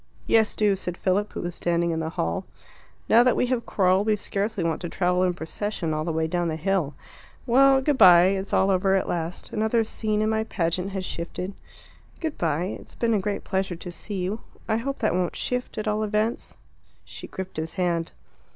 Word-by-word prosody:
"Yes, 220 Hz, -1 st, +3 dB
do," 205 Hz, -2 st, +3 dB
said 180 Hz, -2 st, -5 dB
Philip, 200 Hz, +2 st, 0 dB
who -, -, -4 dB
was 175 Hz, 0 st, -4 dB
standing 170 Hz, 0 st, 0 dB
in 160 Hz, -, -1 dB
the 160 Hz, 0 st, -2 dB
hall. 85 Hz, -, -2 dB, 0.6 s
"Now 230 Hz, -, +6 dB
that 250 Hz, 0 st, +4 dB
we -, -, +2 dB
have 235 Hz, -2 st, -3 dB
quarrelled 190 Hz, +1 st, +2 dB
we 215 Hz, -, +4 dB
scarcely 205 Hz, -1 st, -2 dB
want 165 Hz, -2 st, -1 dB
to 175 Hz, -, -4 dB
travel 180 Hz, 0 st, +1 dB
in 180 Hz, -1 st, +2 dB
procession 170 Hz, 0 st, -3 dB
all 155 Hz, 0 st, -1 dB
the 165 Hz, -, -2 dB
way 160 Hz, 0 st, 0 dB
down 175 Hz, +1 st, -1 dB
the 160 Hz, -, -1 dB
hill. 160 Hz, -4 st, 0 dB, 0.5 s
Well, 270 Hz, +2 st, +5 dB
good 285 Hz, -1 st, +1 dB
bye; 180 Hz, 0 st, +8 dB
it's 195 Hz, 0 st, -2 dB
all 195 Hz, +1 st, +3 dB
over 190 Hz, +1 st, +3 dB
at 190 Hz, -, 0 dB
last; 170 Hz, 0 st, -4 dB
another 220 Hz, +1 st, +2 dB
scene 215 Hz, -1 st, -1 dB
in 215 Hz, -, +1 dB
my 220 Hz, 0 st, +1 dB
pageant 180 Hz, -2 st, -1 dB
has 190 Hz, -1 st, -4 dB
shifted." 180 Hz, +3 st, -5 dB, 0.7 s
"Good 320 Hz, -3 st, -4 dB
bye; 170 Hz, +3 st, 0 dB
it's -, -, -14 dB
been 230 Hz, -1 st, +1 dB
a 210 Hz, -, +3 dB
great 200 Hz, +1 st, -3 dB
pleasure 190 Hz, -2 st, -1 dB
to 175 Hz, +1 st, -8 dB
see 190 Hz, +2 st, -5 dB
you. 205 Hz, +5 st, -3 dB, 0.3 s
I 220 Hz, -, +1 dB
hope 275 Hz, +4 st, -3 dB
that 215 Hz, -, +1 dB
won't 180 Hz, -1 st, 0 dB
shift, 250 Hz, 0 st, -3 dB
at 215 Hz, 0 st, -3 dB
all 210 Hz, 0 st, +1 dB
events." 215 Hz, +2 st, -1 dB, 0.5 s
She -, -, -9 dB
gripped 190 Hz, -2 st, -7 dB
his 160 Hz, +1 st, -4 dB
hand. 170 Hz, -3 st, 0 dB
190 Hz, 210 wpm, -25 LUFS, 175-215 Hz, 0.7 s, bye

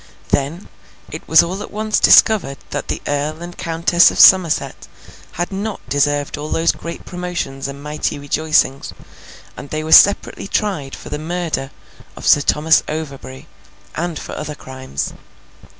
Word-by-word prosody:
Then, 145 Hz, +7 st, -1 dB, 0.4 s
it 155 Hz, -, -8 dB
was 160 Hz, -, +6 dB
all 185 Hz, +4 st, -5 dB
at -, -, -7 dB
once 215 Hz, 0 st, -1 dB
discovered 205 Hz, -11 st, +5 dB
that 145 Hz, -, -4 dB
the -, -, -4 dB
Earl 150 Hz, +3 st, -3 dB
and 175 Hz, 0 st, -9 dB
Countess 170 Hz, +1 st, +3 dB
of -, -, -6 dB
Somerset 165 Hz, -, +4 dB, 0.5 s
had 175 Hz, +3 st, -3 dB
not 200 Hz, +2 st, -4 dB
deserved 145 Hz, +1 st, 0 dB
all 150 Hz, +1 st, -6 dB
those 165 Hz, +1 st, +2 dB
great 170 Hz, 0 st, -9 dB
promotions 175 Hz, -7 st, -5 dB
and 140 Hz, +1 st, -9 dB
mighty 150 Hz, 0 st, -3 dB
rejoicings, 145 Hz, -1 st, 0 dB, 0.6 s
and 140 Hz, -, -10 dB
they 155 Hz, +2 st, -3 dB
were 160 Hz, -, -5 dB
separately 200 Hz, +1 st, +5 dB
tried 190 Hz, -11 st, -2 dB
for -, -, -11 dB
the 150 Hz, -, -4 dB
murder 160 Hz, -4 st, -3 dB, 0.5 s
of -, -, -10 dB
Sir 145 Hz, -, +5 dB
Thomas 155 Hz, +3 st, +3 dB
Overbury, 140 Hz, -4 st, -7 dB, 0.5 s
and 170 Hz, 0 st, -3 dB
for -, -, -8 dB
other 150 Hz, 0 st, -6 dB
crimes. 130 Hz, -, -6 dB
155 Hz, 150 wpm, -18 LUFS, 145-175 Hz, 0.6 s, was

